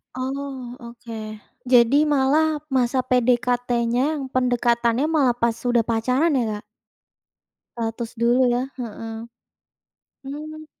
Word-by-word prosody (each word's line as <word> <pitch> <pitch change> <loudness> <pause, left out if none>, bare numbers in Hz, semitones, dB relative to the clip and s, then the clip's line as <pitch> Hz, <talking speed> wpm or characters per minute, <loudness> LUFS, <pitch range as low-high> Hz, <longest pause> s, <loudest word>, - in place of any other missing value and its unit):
Oh, 260 -1 -5
oke. 235 -1 -9 0.5
Jadi 255 +4 +5
malah 295 +2 +2
masa 255 0 +1
PDKT-nya, 245 +2 +1
pendekatannya 240 -1 +1
malah 270 -6 +3
pas 235 -1 +1
sudah 240 0 0
pacaran 250 +8 +1
ya, 265 -4 +2 0.2
Kak? - - -40 1.1
Ratus 230 0 -3
dulu 240 +2 +3
ya 245 - +1 0.2
heeh. 225 -2 -6 1.1
Mmm. 310 +2 -7
250 Hz, 100 wpm, -23 LUFS, 235-270 Hz, 1.1 s, Jadi